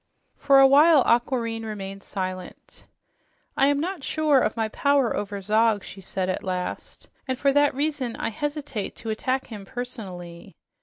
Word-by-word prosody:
For 275 Hz, -1 st, +5 dB
a 270 Hz, -, +8 dB
while 290 Hz, +1 st, +6 dB
Aquareine 235 Hz, -2 st, +1 dB
remained 195 Hz, -2 st, -6 dB
silent. 185 Hz, -2 st, -7 dB, 0.7 s
"I 275 Hz, -, +4 dB
am 285 Hz, 0 st, +2 dB
not 345 Hz, -1 st, -3 dB
sure 305 Hz, -2 st, +2 dB
of 220 Hz, -2 st, -1 dB
my 225 Hz, -1 st, 0 dB
power 280 Hz, +1 st, +2 dB
over 205 Hz, 0 st, -4 dB
him," 215 Hz, +2 st, +2 dB
she 195 Hz, -, -11 dB
said 190 Hz, 0 st, -3 dB
at 185 Hz, -, -2 dB
last, 180 Hz, -1 st, -5 dB, 0.2 s
"and 260 Hz, -1 st, -1 dB
for 275 Hz, +1 st, +2 dB
that 290 Hz, -1 st, +3 dB
reason 280 Hz, -4 st, -2 dB
I -, -, -2 dB
hesitate 285 Hz, -3 st, -4 dB
to 225 Hz, -, -5 dB
attack 255 Hz, +4 st, -1 dB
him 210 Hz, -4 st, -9 dB
personally. 190 Hz, -7 st, -8 dB
235 Hz, 160 wpm, -25 LUFS, 200-280 Hz, 0.7 s, a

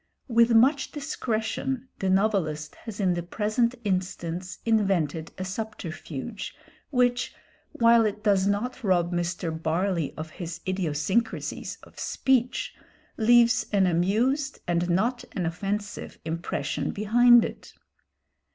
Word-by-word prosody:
With 235 Hz, -1 st, +4 dB
much 270 Hz, +5 st, +4 dB
discretion 260 Hz, -2 st, -2 dB
the 190 Hz, -, 0 dB
novelist 185 Hz, -6 st, +1 dB
has 220 Hz, -3 st, -7 dB
in 185 Hz, -3 st, +2 dB
the 175 Hz, -, -2 dB
present 215 Hz, +7 st, 0 dB
instance 185 Hz, -2 st, -2 dB
invented 190 Hz, -8 st, +1 dB
a 185 Hz, -, -4 dB
subterfuge, 195 Hz, -, -6 dB, 0.3 s
which, 245 Hz, -2 st, +1 dB, 0.4 s
while 230 Hz, 0 st, +5 dB
it 210 Hz, 0 st, -5 dB
does 200 Hz, -2 st, +3 dB
not 240 Hz, +6 st, -1 dB
rob 180 Hz, -3 st, +2 dB
Mr. 175 Hz, 0 st, -1 dB
Barley 165 Hz, +1 st, -1 dB
of 155 Hz, 0 st, -6 dB
his 170 Hz, -1 st, -6 dB
idiosyncrasies 185 Hz, +4 st, -1 dB
of -, -, -15 dB
speech, 255 Hz, -2 st, 0 dB, 0.4 s
leaves 240 Hz, +1 st, +5 dB
an 195 Hz, -2 st, +4 dB
amused 225 Hz, -, +1 dB
and 175 Hz, 0 st, +1 dB
not 225 Hz, +8 st, +1 dB
an 180 Hz, -4 st, -2 dB
offensive 200 Hz, +5 st, -4 dB
impression 155 Hz, -3 st, -2 dB
behind 240 Hz, +3 st, +5 dB
it. -, -, -9 dB
200 Hz, 115 wpm, -26 LUFS, 175-235 Hz, 0.4 s, while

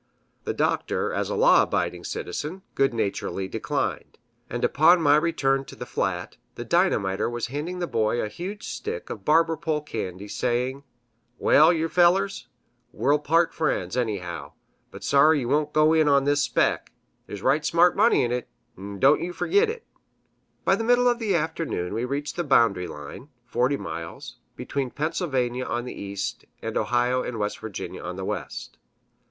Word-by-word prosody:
The -, -, -1 dB
Doctor, -, -, 0 dB
as -, -, -1 dB
a -, -, -2 dB
law -, -, +6 dB
abiding -, -, -1 dB
citizen, 180 Hz, +6 st, -5 dB
good 135 Hz, 0 st, +2 dB
naturedly 100 Hz, -3 st, -2 dB
declined; -, -, -3 dB, 0.3 s
and -, -, -1 dB
upon 170 Hz, +4 st, +5 dB
my 145 Hz, -3 st, +5 dB
return 145 Hz, -4 st, +1 dB
to -, -, -11 dB
the -, -, -7 dB
flat, -, -, -3 dB, 0.2 s
the -, -, -6 dB
Dynamiter 95 Hz, +2 st, +1 dB
was 120 Hz, 0 st, -3 dB
handing 165 Hz, +5 st, -3 dB
the 180 Hz, -, -1 dB
Boy 115 Hz, -5 st, 0 dB
a -, -, -1 dB
huge 185 Hz, -, -7 dB
stick 470 Hz, +2 st, -5 dB
of -, -, -7 dB
barber 165 Hz, +1 st, +3 dB
pole 155 Hz, -1 st, -2 dB
candy, 100 Hz, -8 st, -6 dB
saying, 125 Hz, +5 st, -1 dB, 0.5 s
"Well, 155 Hz, +3 st, +5 dB
yew 165 Hz, -1 st, 0 dB
fellers, 180 Hz, -4 st, +2 dB, 0.4 s
we'll 145 Hz, +2 st, +2 dB
part 165 Hz, +3 st, +2 dB
friends, 95 Hz, -, -1 dB
anyhow 100 Hz, -8 st, -3 dB, 0.4 s
but -, -, -11 dB
sorry 145 Hz, +1 st, +4 dB
yew 120 Hz, -, -3 dB
won't 150 Hz, +1 st, +1 dB
go 155 Hz, +1 st, +4 dB
in 160 Hz, -1 st, +4 dB
on 140 Hz, -1 st, +4 dB
this 145 Hz, +1 st, +2 dB
spec'; -, -, 0 dB, 0.4 s
there's 100 Hz, -1 st, -8 dB
right 150 Hz, +2 st, +2 dB
smart 170 Hz, +3 st, +4 dB
money 220 Hz, -, +4 dB
in 120 Hz, -, -1 dB
't, 125 Hz, 0 st, -2 dB, 0.3 s
'n' 100 Hz, 0 st, -7 dB
don' 140 Hz, +6 st, +5 dB
yer 175 Hz, +1 st, -4 dB
fergit 405 Hz, -, +2 dB
it!" 455 Hz, 0 st, -6 dB, 0.8 s
By -, -, +4 dB
the 225 Hz, -, -3 dB
middle 245 Hz, +1 st, +4 dB
of 240 Hz, -1 st, +2 dB
the 210 Hz, -5 st, 0 dB
afternoon 160 Hz, -, -2 dB
we 115 Hz, +3 st, -1 dB
reached 140 Hz, +5 st, -4 dB
the 175 Hz, -, 0 dB
boundary 115 Hz, -, +3 dB
line 75 Hz, -, -9 dB, 0.2 s
(40 125 Hz, +4 st, +1 dB
miles) 85 Hz, -8 st, -7 dB, 0.2 s
between 135 Hz, -2 st, -3 dB
Pennsylvania 135 Hz, -5 st, -1 dB
on 120 Hz, +1 st, -3 dB
the 125 Hz, -, -6 dB
east 100 Hz, 0 st, -5 dB
and -, -, -5 dB
Ohio 125 Hz, +1 st, +1 dB
and 125 Hz, -, -4 dB
West 105 Hz, -1 st, -2 dB
Virginia 110 Hz, -4 st, -6 dB
on -, -, -5 dB
the -, -, -5 dB
west. -, -, -6 dB
145 Hz, 170 wpm, -25 LUFS, 120-165 Hz, 0.8 s, law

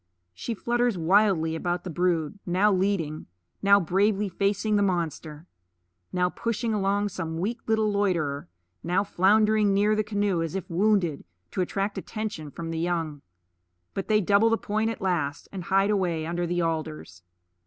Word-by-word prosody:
She 230 Hz, -, -4 dB
flutters 240 Hz, -1 st, 0 dB
wildly 170 Hz, -2 st, +3 dB
about 175 Hz, +1 st, -2 dB
the 180 Hz, -, -5 dB
brood, 175 Hz, +2 st, 0 dB
now 190 Hz, +4 st, +2 dB
leading, 185 Hz, -5 st, -1 dB, 0.3 s
now 200 Hz, 0 st, +6 dB
bravely 200 Hz, +3 st, +1 dB
facing 200 Hz, +3 st, 0 dB
the 205 Hz, -, +3 dB
monster; 165 Hz, -4 st, -2 dB, 0.7 s
now 180 Hz, 0 st, +1 dB
pushing 230 Hz, +4 st, -2 dB
along 205 Hz, 0 st, +1 dB
some 165 Hz, -4 st, -4 dB
weak 220 Hz, +7 st, -2 dB
little 220 Hz, -1 st, +2 dB
loiterer, 170 Hz, -, 0 dB, 0.3 s
now 180 Hz, +3 st, +1 dB
floundering 210 Hz, +1 st, +3 dB
near 210 Hz, +2 st, +3 dB
the 215 Hz, -, +1 dB
canoe 205 Hz, -4 st, 0 dB
as 165 Hz, +2 st, -3 dB
if 195 Hz, -, -4 dB
wounded, 185 Hz, -4 st, +1 dB, 0.3 s
to -, -, -1 dB
attract 195 Hz, +3 st, -2 dB
attention 210 Hz, -9 st, -5 dB
from 165 Hz, +3 st, -6 dB
the 165 Hz, -, -3 dB
young. 165 Hz, -4 st, -2 dB, 0.7 s
But 195 Hz, -, -4 dB
they 215 Hz, -1 st, +3 dB
double 205 Hz, +4 st, +4 dB
the 225 Hz, -, +2 dB
point 215 Hz, +1 st, -1 dB
at 225 Hz, -, -5 dB
last, 160 Hz, -7 st, -1 dB
and 185 Hz, -3 st, -6 dB
hide 195 Hz, +3 st, +3 dB
away 175 Hz, -6 st, 0 dB
under 175 Hz, +1 st, -2 dB
the 175 Hz, 0 st, 0 dB
alders. 90 Hz, -, -4 dB
190 Hz, 160 wpm, -26 LUFS, 165-205 Hz, 0.7 s, now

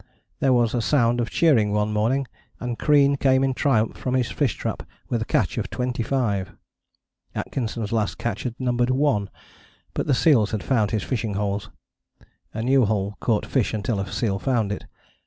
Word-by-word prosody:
There 135 Hz, -, +3 dB
was 120 Hz, -3 st, +3 dB
a 120 Hz, -, +1 dB
sound 120 Hz, -2 st, +2 dB
of 120 Hz, -, -2 dB
cheering 115 Hz, -11 st, +3 dB
one 105 Hz, 0 st, 0 dB
morning, 120 Hz, +6 st, +1 dB, 0.3 s
and 120 Hz, -1 st, -4 dB
Crean 140 Hz, -1 st, +4 dB
came 130 Hz, -1 st, +3 dB
in 135 Hz, -1 st, +1 dB
triumph 120 Hz, -5 st, +1 dB
from 130 Hz, 0 st, -2 dB
his 125 Hz, -2 st, 0 dB
fish 135 Hz, -9 st, 0 dB
trap -, -, -4 dB, 0.3 s
with 115 Hz, -, 0 dB
a -, -, -1 dB
catch -, -, 0 dB
of -, -, -3 dB
25. 120 Hz, -5 st, -1 dB, 0.8 s
Atkinson's 115 Hz, -4 st, -3 dB
last 110 Hz, -3 st, 0 dB
catch 120 Hz, -, -3 dB
had 120 Hz, -2 st, -4 dB
numbered 125 Hz, -1 st, +1 dB
one, 130 Hz, -7 st, +1 dB, 0.6 s
but -, -, -2 dB
the 140 Hz, -, +3 dB
seals 125 Hz, -8 st, +4 dB
had 105 Hz, -, -2 dB
found 110 Hz, -6 st, +1 dB
his 110 Hz, -1 st, -1 dB
fishing 110 Hz, -5 st, -2 dB
holes: 100 Hz, +1 st, -2 dB, 0.8 s
a 110 Hz, -, -4 dB
new 130 Hz, 0 st, +4 dB
hole 100 Hz, -1 st, -1 dB
caught 110 Hz, -3 st, 0 dB
fish 125 Hz, -4 st, 0 dB
until 105 Hz, 0 st, -1 dB
a 95 Hz, 0 st, -4 dB
seal 100 Hz, -5 st, -1 dB
found 115 Hz, -5 st, 0 dB
it. 105 Hz, -, -5 dB
120 Hz, 180 wpm, -24 LUFS, 105-130 Hz, 0.8 s, Crean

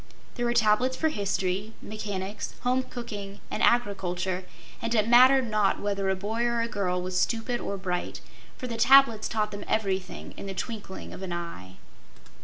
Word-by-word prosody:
There 240 Hz, -1 st, -1 dB
were 235 Hz, -, +1 dB
tablets 235 Hz, +3 st, +3 dB
for 320 Hz, -, +2 dB
history, 200 Hz, -2 st, -1 dB
mechanics, 205 Hz, -1 st, -5 dB
home 255 Hz, +1 st, +2 dB
cooking 205 Hz, -6 st, -7 dB
and -, -, -2 dB
agriculture, 190 Hz, -5 st, +1 dB, 0.4 s
and 230 Hz, 0 st, -1 dB
it 215 Hz, -1 st, +3 dB
mattered 255 Hz, +2 st, +7 dB
not 210 Hz, -2 st, +2 dB
whether 200 Hz, -1 st, -1 dB
a 190 Hz, -, +2 dB
boy 210 Hz, +5 st, -3 dB
or 235 Hz, -1 st, +1 dB
a 230 Hz, -, 0 dB
girl 195 Hz, -5 st, -1 dB
was 180 Hz, 0 st, -1 dB
stupid 235 Hz, +1 st, 0 dB
or 200 Hz, -, -3 dB
bright, 180 Hz, -2 st, -3 dB, 0.4 s
for -, -, -6 dB
the 235 Hz, -2 st, -4 dB
tablets 235 Hz, -2 st, +6 dB
taught 215 Hz, -1 st, 0 dB
them 205 Hz, 0 st, -6 dB
everything 195 Hz, -4 st, -2 dB
in -, -, -6 dB
the 195 Hz, -, -5 dB
twinkling 205 Hz, -1 st, -6 dB
of -, -, -9 dB
an 190 Hz, -2 st, -5 dB
eye. 130 Hz, -, -6 dB
210 Hz, 175 wpm, -27 LUFS, 190-235 Hz, 0.4 s, mattered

